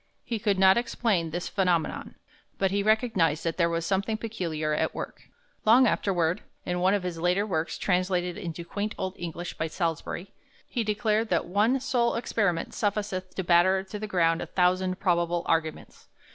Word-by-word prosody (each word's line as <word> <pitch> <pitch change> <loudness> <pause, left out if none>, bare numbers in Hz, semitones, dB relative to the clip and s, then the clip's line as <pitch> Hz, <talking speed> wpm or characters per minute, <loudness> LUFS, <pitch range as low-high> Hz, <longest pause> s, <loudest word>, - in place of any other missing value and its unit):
He 230 -2 -3
could 205 -2 +1
not 190 +1 +6
explain 220 -8 0
this 175 +2 -4
phenomenon, 180 -5 0 0.4
but 195 -1 +1
he 200 +1 +1
recognized 210 - +2
that 165 -1 -2
there 170 -2 +3
was 165 0 -1
something 200 +3 0
peculiar 165 -9 -3
at - - 0
work. - - -7 0.3
Long 240 +4 +6
afterward, 180 -6 +1 0.2
in 180 0 -1
one 190 +3 +3
of 200 - -2
his 175 -2 -4
later 180 +4 +2
works, 165 -5 -2
translated 180 -1 0
into 170 -4 -6
quaint 205 +4 -3
old 190 -1 -3
English 170 0 -5
by 160 - 0
Salusbury, 170 +2 -3 0.4
he 240 - -1
declared 215 +1 0
that 170 - +1
"one 210 +8 +2
sole 245 -2 +1
experiment 200 -7 -1
sufficeth 200 -3 -2
to 190 - -2
batter 185 +2 +4
to 200 +2 -7
the 215 - -4
ground 165 -4 +2
a - - -5
thousand 185 0 +1
probable 175 -2 +1
Arguments." 160 -1 -2
185 Hz, 175 wpm, -27 LUFS, 170-210 Hz, 0.4 s, not